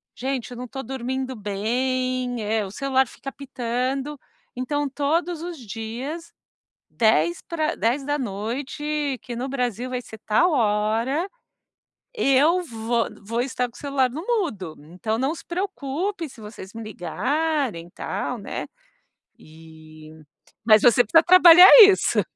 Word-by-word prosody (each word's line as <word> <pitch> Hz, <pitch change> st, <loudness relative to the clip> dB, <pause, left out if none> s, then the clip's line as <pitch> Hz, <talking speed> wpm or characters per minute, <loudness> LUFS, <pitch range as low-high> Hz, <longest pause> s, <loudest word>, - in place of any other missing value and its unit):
gente, 260 Hz, -1 st, -4 dB
eu 245 Hz, -, -8 dB
não 250 Hz, -, -6 dB
estou 265 Hz, +2 st, -7 dB
dormindo 260 Hz, +1 st, -4 dB
bem, 245 Hz, +4 st, -2 dB
eh, 215 Hz, 0 st, 0 dB
o 190 Hz, -, -9 dB
celular 265 Hz, +3 st, +1 dB
fica 275 Hz, -, -9 dB
apitando, 270 Hz, +2 st, -4 dB, 0.4 s
então 290 Hz, +4 st, -2 dB
todos 320 Hz, +4 st, -1 dB
os 345 Hz, -1 st, -6 dB
dias 240 Hz, -, -7 dB, 0.6 s
10 170 Hz, -7 st, +2 dB
pra 325 Hz, -1 st, -2 dB
22h 275 Hz, +3 st, -2 dB
que 240 Hz, -, -7 dB
no 255 Hz, +3 st, -4 dB
Brasil 250 Hz, -2 st, -2 dB
vai 250 Hz, -1 st, -3 dB
ser 220 Hz, -2 st, -12 dB
tal 220 Hz, +12 st, +2 dB
hora, 230 Hz, -, 0 dB, 0.9 s
eu 320 Hz, -, +3 dB
vou 230 Hz, -5 st, -2 dB
vou 230 Hz, +4 st, -3 dB
estar 250 Hz, 0 st, -1 dB
com 235 Hz, -, -21 dB
o -, -, -12 dB
celular 275 Hz, -3 st, 0 dB
no 300 Hz, +6 st, -6 dB
mudo. 290 Hz, -, -2 dB
Então 180 Hz, +9 st, -4 dB
não 270 Hz, +5 st, 0 dB
se -, -, -12 dB
preocupe 345 Hz, -1 st, -3 dB
se 250 Hz, -, -15 dB
vocês 210 Hz, -2 st, -10 dB
me 225 Hz, -, -7 dB
ligarem 240 Hz, -, -2 dB
e -, -, -18 dB
tal", -, -, -4 dB
né. -, -, -6 dB, 0.7 s
E 155 Hz, -1 st, -15 dB, 0.5 s
mas 215 Hz, -1 st, +6 dB
você 245 Hz, 0 st, +6 dB
precisa 325 Hz, +10 st, +5 dB
trabalhar 360 Hz, 0 st, +9 dB
isso. 395 Hz, -2 st, +5 dB
255 Hz, 135 wpm, -23 LUFS, 220-290 Hz, 0.9 s, trabalhar